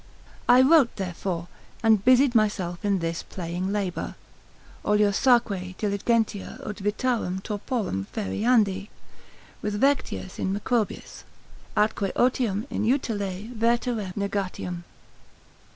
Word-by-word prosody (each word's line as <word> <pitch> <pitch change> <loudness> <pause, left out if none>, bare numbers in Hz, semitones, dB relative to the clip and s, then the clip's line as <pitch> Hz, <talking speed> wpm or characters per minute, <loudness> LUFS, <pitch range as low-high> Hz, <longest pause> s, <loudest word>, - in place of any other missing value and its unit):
I 250 +1 +8
wrote 280 -3 +5
therefore, 175 -2 -3 0.4
and 220 -3 +4
busied 255 +1 +5
myself 205 -5 0
in 200 -1 +2
this 165 -1 -2
playing 180 +1 -4
labour, 200 -4 -2 0.7
oliosaque 205 -2 +2
diligentia 210 0 0
ut 210 - -5
vitarem 205 -2 -1
torporum 205 - -3
feriandi 200 - +1 0.7
with 210 0 -2
Vectius 270 -8 0
in 190 - 0
Macrobius, 220 +1 -2 0.5
atque 210 -2 +1
otium 240 -4 +1
in - - -1
utile 215 -5 -1
verterem 230 -3 0
negatium. 190 -3 -3
205 Hz, 100 wpm, -26 LUFS, 190-235 Hz, 0.7 s, I